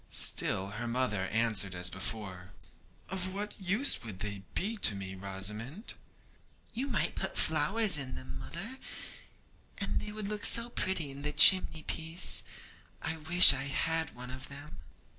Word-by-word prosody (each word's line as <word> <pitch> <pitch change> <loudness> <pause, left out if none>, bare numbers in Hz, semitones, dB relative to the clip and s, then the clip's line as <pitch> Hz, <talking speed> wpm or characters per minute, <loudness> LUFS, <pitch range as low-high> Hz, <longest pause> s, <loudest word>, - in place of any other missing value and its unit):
Still 95 +1 +2
her 120 - -4
mother 115 -6 -2
answered 105 -4 +1
as 90 0 +2
before: 95 -1 -5 0.6
'Of 185 0 0
what 205 0 -4
use 205 +9 +2
would 110 -6 -8
they 100 -1 -6
be 215 +5 -2
to 110 - +5
me, 95 -1 -7
Rosamond?' 105 - -5 0.8
'You 255 +5 -2
might 180 - -1
put - - -3
flowers 170 +5 +2
in 130 -2 -5
them, 65 0 -8
mother, 225 +11 -8 1.0
and 200 - -2
they 210 - -7
would 210 -1 -5
look 210 0 -4
so 235 +1 +5
pretty 170 - -3
on 140 - -10
the 150 +1 -1
chimney 160 +1 +6
piece. 160 +2 0 0.6
I 160 - -5
wish 175 +4 +8
I 135 +1 -4
had 160 +3 -2
one 125 +1 -9
of 130 +1 -9
them.' 145 +1 -10
145 Hz, 155 wpm, -30 LUFS, -, 1.0 s, wish